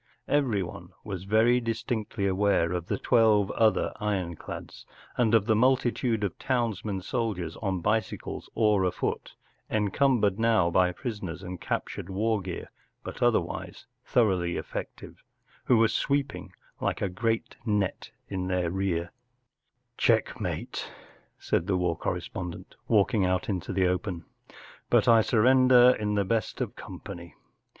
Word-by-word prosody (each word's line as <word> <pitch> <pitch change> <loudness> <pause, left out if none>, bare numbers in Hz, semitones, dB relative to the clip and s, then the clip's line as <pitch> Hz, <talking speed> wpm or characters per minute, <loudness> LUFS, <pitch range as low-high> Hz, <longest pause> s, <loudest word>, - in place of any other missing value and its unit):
Everyone 100 -10 -1
was 95 -3 -6
very 115 +4 +4
dis¬ 115 -1 -3
tinctly 110 -4 -2
aware 95 -3 +2
of 90 -1 -3
the - - -1
twelve 110 -5 +3
other 110 -1 +2
ironclads, 95 -6 -4 0.3
and 115 -2 +3
of 105 -3 +3
the 110 -1 +3
multitude 125 -2 +2
of 100 -5 -3
townsmen 110 -6 -1
sol¬ 115 +1 -1
diers, 85 -2 -5
on 95 -4 -1
bicycles 110 +4 -2
or 105 -3 +3
afoot* 90 -1 -2 0.3
encum¬ 115 +5 +2
bered 105 0 +1
now 110 -7 +3
by 90 0 +3
prisoners 95 - -6
and 90 -1 -7
captured 85 - -4
war 105 +2 0
gear 90 -1 -6 0.3
but - - -7
other¬ - - +3
wise - - -8 0.2
thoroughly 95 -7 +1
effective, - - -7 0.4
who 125 - +4
were 115 0 +5
sweeping 140 +4 -1 0.3
like - - -1
a - - +2
great 115 +5 -2
net 105 -3 -1 0.2
in 95 -2 -3
their 90 -2 0
rear, 90 -3 -1 0.4
“ - - -51
Checkmate,” - - 0 0.5
said 85 - -1
the 95 -2 +1
war 90 -2 0
correspondent, 90 +1 -5
walking 105 -1 +3
out 90 0 0
into 95 -3 -2
the 95 0 +2
open. 90 -2 -2 0.3
“ - - -20
But - - +4
I 115 -1 +7
surrender 125 +2 +5
in 105 -1 -1
the 100 -1 +1
best 110 0 -1
of - - -3
company. 85 0 -9
105 Hz, 145 wpm, -27 LUFS, 90-115 Hz, 0.5 s, I